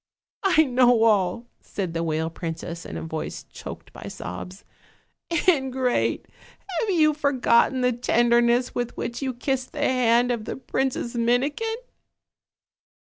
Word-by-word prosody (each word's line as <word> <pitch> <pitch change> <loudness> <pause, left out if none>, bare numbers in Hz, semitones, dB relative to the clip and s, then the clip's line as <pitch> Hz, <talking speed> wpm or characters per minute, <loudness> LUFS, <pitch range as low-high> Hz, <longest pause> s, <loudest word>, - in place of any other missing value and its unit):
"I 365 -6 +4
know 245 -4 +4
all," 210 0 +2 0.2
said 185 -5 -4
the 165 - -1
whale 160 0 -1
princess 165 0 -6
in 80 - -6
a 80 - -5
voice 80 - -5
choked - - -10
by - - -9
sobs. 180 - -7 0.8
"Ingrate! 265 -6 +1 0.5
have 445 - -1
you 310 -5 +4
forgotten 265 -3 +2
the 250 0 +3
tenderness 240 +1 +2
with 245 -1 -3
which 235 - -4
you 265 -1 -1
kissed 255 +1 -3
the 290 - -2
hand 245 -1 +3
of 230 -3 -3
the - - -4
Princess 265 -2 -2
Mini 245 +4 +2
kin?" 450 +8 -3
245 Hz, 135 wpm, -24 LUFS, 220-265 Hz, 0.8 s, I